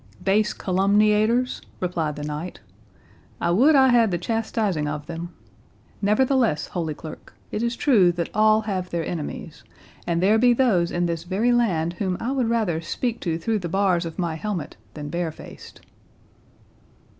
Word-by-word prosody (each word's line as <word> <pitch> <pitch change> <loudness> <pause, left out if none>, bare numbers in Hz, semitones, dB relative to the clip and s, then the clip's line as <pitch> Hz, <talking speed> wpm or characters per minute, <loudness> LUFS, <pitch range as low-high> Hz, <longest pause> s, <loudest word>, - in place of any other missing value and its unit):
"Base 205 +2 +2
calumniators!" 210 +6 +2 0.2
replied 165 -5 -2
the 145 - -6
knight; 150 +4 -5 0.8
"I - - 0
would 270 - +5
I 265 -1 +6
had 235 -3 +4
the 175 - -1
chastising 210 -4 -1
of 150 0 -4
them. 170 +1 -6 0.7
Nevertheless, 225 - +2
Holy 160 -4 -3
Clerk, 160 +1 -11 0.2
it 210 - -2
is 235 0 -1
true 215 -11 +4
that 170 -1 -3
all 215 0 +4
have 190 -4 -3
their 170 -2 -2
enemies; 155 -1 -6 0.4
and 170 -1 +1
there 205 +5 +4
be 245 +1 +5
those 215 -9 +2
in 175 0 -1
this 170 -1 -2
very 200 +7 +1
land 175 -9 +1
whom 185 -3 -1
I 240 - -2
would 255 -4 0
rather 210 -9 0
speak 235 +7 -3
to 165 -3 -2
through 215 +6 -1
the 175 -3 -5
bars 185 -1 +2
of 165 -1 -7
my 170 -3 -1
helmet 180 -5 -4 0.2
than 150 -1 -6
barefaced." 170 -1 -6
190 Hz, 160 wpm, -23 LUFS, 170-225 Hz, 0.8 s, I